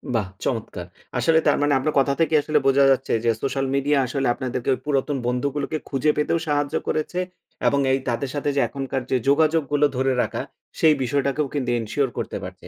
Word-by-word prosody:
বাহ! 105 -4 0 0.2
চমৎকার। 110 -7 -3 0.3
আসলে 160 +6 +4
তার - - +4
মানে 145 0 +2
আপনার 150 +3 -1
কথা 140 +1 +2
থেকে 160 -1 +1
আসলে 150 +1 0
বোঝা 135 +1 +5
যাচ্ছে 135 0 0
যে 115 - +4
সোশ্যাল 135 0 -1
মিডিয়া 140 +1 +2
আসলে 135 +2 -1
আপনাদেরকে 125 0 -4
ওই - - -4
পুরাতন 145 0 0
বন্ধুগুলোকে 140 +5 -1
খুঁজে 140 +2 +2
পেতেও 150 +3 +1
সাহায্য 145 +1 0
করেছে 155 +3 -1 0.5
এবং 140 - +3
এই 135 - +2
তাদের 125 +3 -2
সাথে 145 0 -1
যে - - +2
এখনকার 135 -1 -4
যে 130 - +3
যোগাযোগগুলো 150 -1 +3
ধরে 130 +1 +2
রাখা - - -2 0.4
সেই 160 -1 +6
বিষয়টাকেও 140 +3 0
কিন্তু 130 -4 -2
এনশিওর 130 +5 -1
করতে - - -3
পারছে। - - -9
140 Hz, 185 wpm, -23 LUFS, 130-150 Hz, 0.5 s, সেই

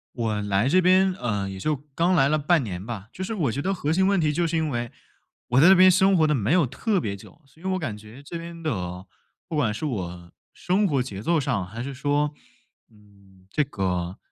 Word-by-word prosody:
我 110 -3 -1
来 100 +5 +1
这 185 +3 +4
边 185 +1 +4
呃， 105 -5 -2
也 95 0 -7
就 155 +8 0 0.2
刚 175 +4 +2
来 140 -4 +4
了 155 - +2
半 155 -1 +2
年 95 -3 -5
吧。 110 -2 -7
就 185 - -10
是 225 - -3
我 150 - 0
觉 140 - -3
得 195 +4 0
核 155 -4 -2
心 190 +3 +3
问 200 -2 +2
题 155 -2 +2
就 170 +2 0
是， 165 - -2
因 160 -1 0
为 120 -2 -3 0.6
我 125 +2 +4
在 170 - +7
这 190 - +8
边 185 +1 +7
生 190 +1 +4
活 160 - +4
得 150 - +2
没 120 - +1
有 175 -5 +4
特 190 - -1
别 100 -2 -3
久。 100 - -16
所 160 +4 -23
以 - - -13
我 190 0 0
感 115 -10 -4
觉 110 +6 -13
这 170 +4 -6
边 170 0 -9
的 90 - -3 0.4
不 160 - -3
管 110 -7 +1
是 115 - -7
我 90 - -5 0.2
生 195 +3 +1
活 135 -5 +1
节 100 -5 -7
奏 170 +6 +1
上， 120 -10 -1
还 115 +5 -6
是 140 0 -5
说， 145 +2 0 0.6
嗯， 100 -3 -22
这 150 - +1
个 90 -6 -3
140 Hz, 255 characters per minute, -24 LUFS, 105-170 Hz, 0.6 s, 这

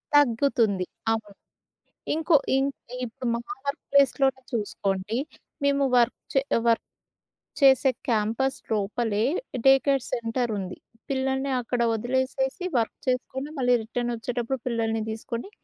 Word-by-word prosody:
తగ్గుతుంది. 235 -7 +3 0.3
అవును. 210 -3 -3 0.8
ఇంకో 320 +1 +3 0.2
ఇంక్ 275 +1 0 0.3
ఇప్పుడు 240 +2 -6
మా - - -2 0.3
వర్క్ 280 - -2
ప్లేస్‌లోనే 270 -1 +3
చూసుకోండి. 205 0 -1 0.5
మేము 280 0 +3
వర్క్ 240 0 +3 0.2
చే 270 - +4 0.3
వర్క్ 230 - +3 0.8
చేసే 270 0 +6 0.2
క్యాంపస్‌ 230 +4 +1 0.2
లోపలే 215 +1 0 0.4
డే 270 - +9
కేర్ 275 -3 +2
సెంటర్ 235 0 -1
ఉంది. 185 -1 -6 0.3
పిల్లల్ని 265 0 0
అక్కడ 240 0 -2
వదిలేసేసి 260 - -1 0.2
వర్క్ 225 - -2
చేసుకొని 260 +3 -1
మళ్ళీ 250 -1 +3
రిటర్న్ 240 +2 -2
వచ్చేటప్పుడు 245 +2 -3
పిల్లల్ని 225 -2 0
దిసుకొని 230 - -5
245 Hz, 115 wpm, -26 LUFS, 225-270 Hz, 0.8 s, డే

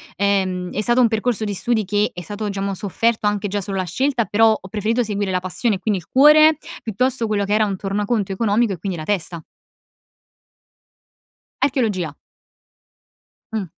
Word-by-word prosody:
Ehm, 185 -2 0
è 210 - -1
stato 240 +3 +2
un 245 - +6
percorso 225 0 -1
di 205 -1 -2
studi 220 +1 0
che 205 +2 +1
è 180 - -8
stato 205 +4 -5
diciamo 195 0 -3
sofferto 210 +3 0
anche 205 -1 -1
già 205 +1 -2
solo 195 +1 -4
la 185 - 0
scelta 240 - 0
però 220 +1 +3
ho 190 - -12
preferito 220 +5 0
seguire 205 -2 -2
la 185 -1 0
passione 185 +4 -1
e - - -7
quindi 200 0 -1
il 170 - -17
cuore 305 +3 +6 0.2
piuttosto 240 +2 -1
quello 205 -1 0
che 205 - -1
era 215 0 +3
un 195 -2 -3
tornaconto 200 +1 -1
economico 210 +2 +1
e - - -6
quindi 190 0 -4
la 155 - -6
testa. 170 -3 -3 2.2
Archeologia. 215 - 0 1.4
Mh. 215 -4 -2
205 Hz, 175 wpm, -20 LUFS, 190-230 Hz, 2.2 s, un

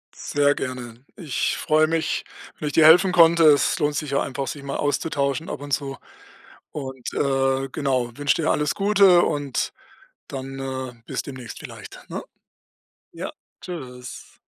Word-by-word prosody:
Sehr 145 0 +1
gerne. 125 -1 -6
Ich 160 - -1
freue 155 0 +3
mich, 160 0 -1 0.4
wenn 150 - -3
ich 145 - -3
dir 155 - +6
helfen 180 +4 +7
konnte. 170 -1 +6
Es 150 -2 +5
lohnt 145 -1 +1
sich 145 -2 -3
ja 140 - +2
einfach 135 0 -3
sich 145 - -6
mal 140 0 -3
auszutauschen 145 +1 -1
ab - - -5
und 145 - -8
zu 135 -1 -2 0.7
und, 130 -4 -6
äh, 135 -1 +1
genau, 130 -5 -1
wünsche 145 0 +2
dir - - +2
alles 150 0 0
Gute 195 -3 +5
und 145 -3 -1 0.5
dann, 135 0 -6
äh, 130 -1 -4
bis - - -3
demnächst 130 -5 -8
vielleicht, - - -10
ne? - - -5 0.9
Ja, - - -5 0.3
Tschüss. 125 -8 -9
140 Hz, 155 wpm, -23 LUFS, 135-155 Hz, 0.9 s, helfen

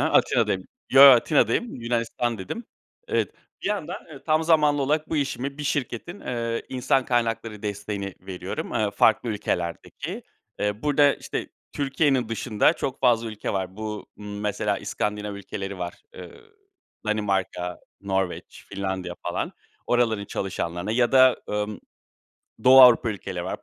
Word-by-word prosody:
Atina'dayım. - - +2 0.3
Yo, 135 +1 +8
Atina'dayım. 140 - +6
Yunanistan, 115 0 -1
dedim. 95 - -6 0.4
Evet, - - 0 0.3
bir - - -4
yandan, 190 -5 -2
eee, 140 -3 -11
tam 155 0 +3
zamanlı 150 -3 +4
olarak 150 +3 0
bu 160 - 0
işimi 140 -1 -2
bir 150 - -4
şirketin, 145 - -3
eee, 115 -1 -3
insan 130 +1 +1
kaynakları 115 -3 -1
desteğini 100 -1 -4
veriyorum, 95 0 -6
eee, 110 -3 +1
farklı 110 +3 +3
ülkelerdeki. 90 -5 -3 0.4
Eee, 105 +1 -2
burada 145 -1 +4
işte - - -5 0.2
Türkiye'nin 135 -3 +1
dışında 115 +4 +2
çok 135 -5 -4
fazla 115 -2 +3
ülke 110 -1 -4
var. 95 -1 -3
Bu, 110 -1 -5
ımm, 105 0 -7
mesela 105 -1 -1
İskandinav 105 -1 -3
ülkeleri 100 0 -6
var. 90 -1 -4 0.2
Iıı, 450 -1 -11 0.6
Danimarka, 95 -4 -1 0.2
Norveç, 95 -2 -3
Finlandiya 95 -3 -4
falan. - - -3 0.3
Oraların 115 -4 +1
çalışanlarına 90 0 -3
ya 120 +2 +2
da, 130 -1 +7
ımm, 105 0 -3 0.8
Doğu 130 +1 +9
Avrupa 125 -1 +8
ülkeleri 100 - -5
var. - - -5
115 Hz, 135 wpm, -25 LUFS, 100-135 Hz, 0.8 s, Doğu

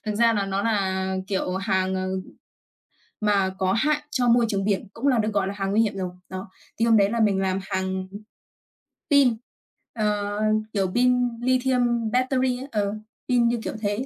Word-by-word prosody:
thực 210 - -1
ra 230 +1 +4
là 200 -2 0
nó 195 +1 -1
nà, 190 -3 0
kiểu, 190 -2 -1
hàng, 190 -1 0
ờ, 185 0 -2 1.1
mà 200 -3 +2
có 190 0 +1
hại 300 +6 +1
cho 250 -4 0
môi 235 0 +5
trường 195 -1 -1
biển, 205 0 0
cũng 270 +5 -2
là 255 -3 +4
được 215 0 0
gọi 195 -2 +1
là 200 - -3
hàng 195 -1 -3
nguy 220 +2 +3
hiểm 215 -2 0
rồi. 185 -1 -3 0.2
Đó. 185 0 -7 0.3
Thì 230 - +3
hôm 225 -1 +5
đấy 200 0 +4
là 230 0 -1
mình 205 -3 +3
làm 190 0 0
hàng 190 0 -3 1.0
pin, 265 -6 +5 0.6
ờ, 205 -1 0 0.3
kiểu, 195 -2 +1
pin 250 0 +3
lithium 245 -3 +1
battery 255 0 +1
ấy. 270 - -7
Ờ, 205 -1 0 0.4
pin, 235 -1 +2
kiểu, - - -4
thế 205 +5 -1
210 Hz, 185 wpm, -24 LUFS, 195-240 Hz, 1.1 s, môi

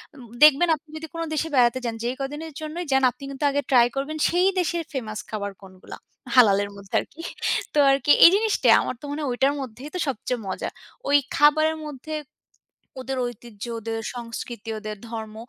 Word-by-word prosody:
উম 260 - -12 0.2
দেখবেন 305 +3 +7
আপনি 310 +1 -19
যদি 320 0 -7
কোন 330 - -4
দেশে 320 +1 -1
বেড়াতে 245 0 +4
যান, 230 -1 -2
যেই 245 +2 -1
কদিনের 295 +4 -5
জন্যই 325 +3 -5
যান 265 0 +3
আপনি 275 - -16
কিন্তু 275 +2 -6
আগে 285 +1 0
ট্রাই 245 -2 +6
করবেন 290 +3 -3
সেই 360 +2 +3
দেশের 340 -1 -1
ফেমাস 215 -5 -4
খাবার 200 -2 -4
কোনগুলা। 185 -1 -12 0.4
হালালের 205 -4 +5
মধ্যে 200 -1 -14
আরকি। 330 - -9 0.5
তো - - -2
আরকি 275 +1 +2
এই - - +11
জিনিসটা 435 0 +1
আমার - - -3
তো - - -8
মনে 300 +1 -4
হয় 280 - -1
ঐটার 270 +3 +2
মধ্যেই 255 +3 -8
তো - - -2
সবচেয়ে 250 -1 -2
মজা। 190 - -3 0.4
ওই 290 - +6 0.2
খাবারের 310 +2 +4
মধ্যে, 300 +1 -7 0.9
ওদের 265 0 -4
ঐতিহ্য, 235 -3 -9 0.2
ওদের 225 0 -4 0.2
সংস্কৃতি, 230 -1 -7
ওদের 215 0 -6
ধর্ম 220 -2 -6
265 Hz, 180 wpm, -24 LUFS, 225-305 Hz, 0.9 s, এই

